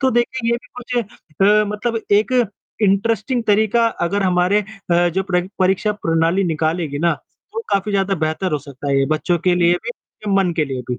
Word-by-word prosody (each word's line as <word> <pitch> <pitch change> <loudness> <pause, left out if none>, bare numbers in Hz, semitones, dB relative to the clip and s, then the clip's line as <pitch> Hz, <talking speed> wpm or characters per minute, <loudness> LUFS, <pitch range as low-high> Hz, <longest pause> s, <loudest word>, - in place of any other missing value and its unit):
तो 265 -1 +3
देखिए 240 0 0
ये 235 - +2
भी 250 +1 -14
कुछ 250 +1 -4 0.5
अ, 210 +2 +5
मतलब 225 +2 -2
एक 210 +5 +3 0.5
इंटरेस्टिंग 220 +4 +1
तरीका 220 +2 +3 0.2
अगर 200 +3 0
हमारे 185 +2 +2 0.3
अ, 175 +1 +4
जो 185 +3 -1
परी 180 -1 +3 0.2
परीक्षा 190 +3 +2
प्रणाली 165 0 +1
निकालेगी 160 -2 -1
ना, 170 +2 +2 0.4
तो 455 - -3
काफ़ी 200 +1 +1
ज़्यादा 195 0 +1
बेहतर 160 +2 -2
हो 150 - +1
सकता 140 0 -8
है 135 - +3
ये 135 - +2
बच्चों 170 +3 0
के 180 - +4
लिए 175 0 +3
भी 235 - -3 0.4
और - - +1
मन 180 - 0
के 155 - +2
लिए 135 -3 -4
भी। 125 - -2
190 Hz, 195 wpm, -19 LUFS, 165-215 Hz, 0.5 s, अ